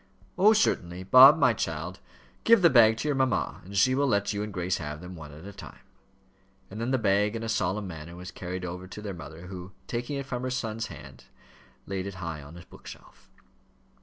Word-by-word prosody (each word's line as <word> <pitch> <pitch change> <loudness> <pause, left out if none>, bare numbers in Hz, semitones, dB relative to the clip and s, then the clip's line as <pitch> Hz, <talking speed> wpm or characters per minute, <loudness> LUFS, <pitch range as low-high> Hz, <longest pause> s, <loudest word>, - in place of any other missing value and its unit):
"Oh, 205 +2 +6
certainly. 90 - 0
Bob, 130 - +9
my 130 -6 +4
child, 85 -1 -4 0.4
give 230 -4 +5
the 170 - +7
bag 110 -3 +6
to 150 - -3
your 145 - +2
mamma, 130 -2 0
and 100 +2 -7
she 130 +7 +4
will 140 +2 +2
let 100 -3 +1
you 100 - -3
and 105 0 -4
Grace 90 -1 -1
have 75 -1 -6
them, 90 +1 -9
one 75 -3 -10
at 75 +4 -12
a 100 - -9
time." - - -12 0.9
And 105 +3 -6
then 115 - -1
the 130 - +2
bag 105 -1 +1
in 115 - -4
a - - -3
solemn 105 -2 -1
manner 85 -2 -8
was 90 +1 -9
carried 90 0 -6
over 90 +1 -6
to 95 - -9
their 100 -2 -4
mother, 80 +1 -10
who, 90 0 -9
taking 125 +4 -3
it 140 - -4
from 125 -2 -4
her 130 - -2
son's 115 -3 -3
hands, - - -12 0.6
laid 95 -1 -4
it 100 - -7
high 85 -4 -5
on 70 +4 -12
a 85 - -12
bookshelf. - - -14
100 Hz, 220 wpm, -27 LUFS, 90-125 Hz, 0.9 s, Bob